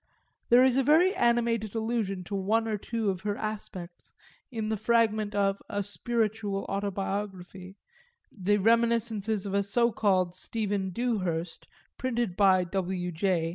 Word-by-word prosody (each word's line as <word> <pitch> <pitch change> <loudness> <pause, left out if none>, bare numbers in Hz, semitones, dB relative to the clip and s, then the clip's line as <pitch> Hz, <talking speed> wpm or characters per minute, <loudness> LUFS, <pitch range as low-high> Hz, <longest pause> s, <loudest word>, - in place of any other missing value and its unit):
There 245 +2 +7
is 260 -1 +4
a 270 - +3
very 330 +7 +5
animated 235 - +1
allusion 220 -4 -1
to 190 - -9
one 215 +4 +1
or 220 - 0
two 220 0 -2
of 185 -1 -6
her 205 0 -2
aspects 195 -5 -7 0.3
in 220 -4 -3
the 220 - 0
fragment 215 -2 +1
of 195 -1 +1
a 205 -2 -2
"spiritual 210 -1 -2
autobiography," 195 -1 -4 0.6
the 205 0 +1
reminiscences 225 -1 +1
of 200 - -4
a 200 - +3
so 235 +4 +1
called 185 -5 +1
Stephen 205 -2 -2
Dewhurst 185 -7 -2 0.3
printed 240 -7 -1
by 190 -2 +4
W. 180 0 -3
J. 170 -1 0
205 Hz, 140 wpm, -28 LUFS, 190-230 Hz, 0.6 s, There